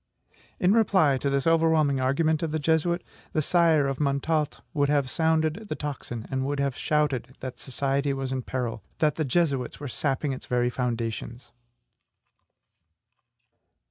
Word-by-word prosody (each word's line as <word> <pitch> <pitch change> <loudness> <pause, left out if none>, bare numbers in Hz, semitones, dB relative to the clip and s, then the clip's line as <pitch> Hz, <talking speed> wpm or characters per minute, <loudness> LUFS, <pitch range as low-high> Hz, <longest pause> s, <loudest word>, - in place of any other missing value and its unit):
In 185 +2 +4
reply 190 - +4
to 140 - 0
this 140 0 0
overwhelming 160 -4 +3
argument 155 +4 +1
of 165 -2 -2
the 155 - 0
Jesuit, 160 +3 +1 0.3
the 155 - +2
sire 165 -3 +4
of 135 -1 -2
Montalte 150 +2 0
would 145 -2 +1
have 145 -3 +1
sounded 160 +5 +1
the - - -2
tocsin, 120 -6 -5
and 130 0 0
would 140 +1 -2
have 140 -2 0
shouted 145 -5 0
that 130 -1 -6
society 140 +1 -1
was 135 -1 -3
in 130 -1 -1
peril, 125 -3 -3 0.2
that 150 -2 +2
the 155 - -2
Jesuits 140 -3 0
were 145 - -5
sapping 135 +2 -1
its 130 - -8
very 125 0 +1
foundations. 120 0 -3
140 Hz, 150 wpm, -26 LUFS, 130-160 Hz, 0.3 s, In